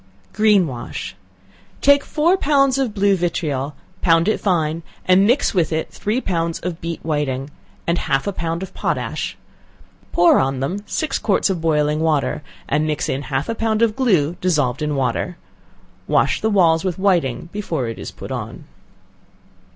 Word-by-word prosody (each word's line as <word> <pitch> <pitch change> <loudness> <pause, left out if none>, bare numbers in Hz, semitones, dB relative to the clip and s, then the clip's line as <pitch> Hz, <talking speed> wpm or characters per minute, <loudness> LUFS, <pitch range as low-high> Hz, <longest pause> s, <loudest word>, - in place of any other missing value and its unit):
Green 210 -3 +4
wash. 125 - -6 0.6
Take 285 0 +5
four 330 +4 +2
pounds 275 -6 +2
of 260 -5 0
blue 200 -1 +3
vitriol, 150 -6 -2 0.3
pound 165 0 +4
it 215 - +1
fine, 165 -4 0 0.2
and 185 +2 +5
mix 250 +2 +2
with 170 -5 +1
it 160 0 -2
three 215 +5 -1
pounds 165 -7 -1
of 175 -1 -4
beat 165 -1 -5
whiting, 145 -3 -2 0.3
and 170 +1 +1
half 135 0 0
a 200 - -2
pound 170 +1 -3
of 190 - -8
potash; - - -2 0.7
pour 175 0 +5
on 135 0 0
them 170 +10 -2
six 310 -3 -1
quarts 200 -2 +1
of 175 -4 -3
boiling 150 -2 +1
water, 155 -3 0 0.3
and 150 +2 +1
mix 150 -1 -1
in 135 - -1
half 135 0 -2
a 230 - -1
pound 225 0 0
of 220 -2 +2
glue 180 - +2
dissolved 145 -9 +1
in 150 -1 -1
water. 135 +6 -1 0.7
Wash - - +2
the 220 - +1
walls 170 -6 +4
with 185 -3 -2
whiting 170 -7 +1
before 170 - -3
it 115 - -6
is - - -6
put - - -9
on. - - -5
170 Hz, 165 wpm, -20 LUFS, 150-205 Hz, 0.7 s, Take